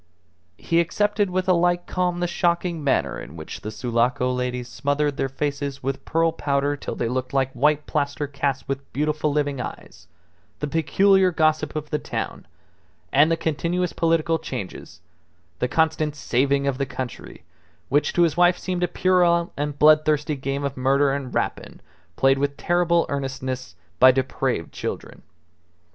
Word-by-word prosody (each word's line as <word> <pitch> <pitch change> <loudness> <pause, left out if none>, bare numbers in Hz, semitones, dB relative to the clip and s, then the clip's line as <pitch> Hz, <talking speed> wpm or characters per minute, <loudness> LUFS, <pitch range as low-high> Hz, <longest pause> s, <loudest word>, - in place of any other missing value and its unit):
He 165 +9 +1
accepted 205 +4 +1
with 185 +1 -1
a 185 - +5
like 175 0 +2
calm 180 -1 -1
the 175 - +1
shocking 170 -1 0
manner 80 - 0
in - - -10
which 80 -1 -8
the 110 - -5
Sulaco 120 +3 0
ladies 125 -1 -3
smothered 145 +2 -1
their 135 - -1
faces 140 0 -3
with 135 +1 -3
pearl 165 0 +2
powder 145 -1 0
till - - -6
they 120 - -1
looked 130 +2 -3
like 135 -1 +2
white 150 +4 +2
plaster 145 0 -1
casts 140 -1 -2
with 135 0 -5
beautiful 150 +1 0
living 145 -3 -1
eyes, - - -9 0.5
the - - -2
peculiar 185 +5 +3
gossip 155 -3 +1
of 150 0 -5
the 150 - 0
town, - - -5 0.7
and 145 +4 +5
the 165 - +1
continuous 170 +3 -1
political 165 0 +1
changes, 120 - -7 0.6
the 125 - +1
constant 155 0 +1
"saving 140 +1 +1
of 140 -1 -1
the 140 - -1
country," 130 -2 -7 0.5
which 145 +2 +2
to 175 - +4
his 160 -3 +2
wife 175 0 +4
seemed 180 -1 -3
a 180 - +2
puerile 175 -2 +2
and 145 0 -3
bloodthirsty 155 0 +4
game 135 +1 -3
of 140 -1 -2
murder 135 +2 +2
and 135 -3 -4
rapine - - -3 0.4
played 135 0 +3
with 140 0 -1
terrible 175 -1 +2
earnestness 130 -5 -4 0.2
by 130 - +9
depraved 130 -6 -1
children. - - -6
145 Hz, 160 wpm, -23 LUFS, 135-165 Hz, 0.7 s, by